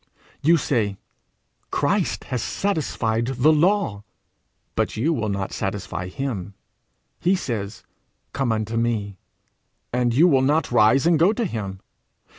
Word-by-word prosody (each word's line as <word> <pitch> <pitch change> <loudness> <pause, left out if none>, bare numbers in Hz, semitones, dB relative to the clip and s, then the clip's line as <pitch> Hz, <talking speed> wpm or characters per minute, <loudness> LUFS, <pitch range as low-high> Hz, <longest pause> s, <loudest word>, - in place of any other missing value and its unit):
You 165 +4 +5
say 110 -9 0 0.7
'Christ - - 0
has 125 -2 -3
satisfied 120 - -1
the 135 +4 +3
law,' 160 - +1 0.7
but - - -1
you 150 +9 +1
will 110 -7 -1
not 100 -1 -3
satisfy 95 -2 -3
him! 100 -4 -4 0.6
He 180 +3 +2
says, 110 - -4 0.5
'Come 135 -4 0
unto 110 +1 -2
me,' 110 -4 -1 0.8
and 125 -1 +2
you 150 +9 +5
will 135 -6 +4
not 145 +3 +1
rise 120 +4 +4
and 170 -2 +4
go 180 +6 +5
to 230 +1 -1
him. 100 - -5
120 Hz, 130 wpm, -23 LUFS, 105-155 Hz, 0.8 s, You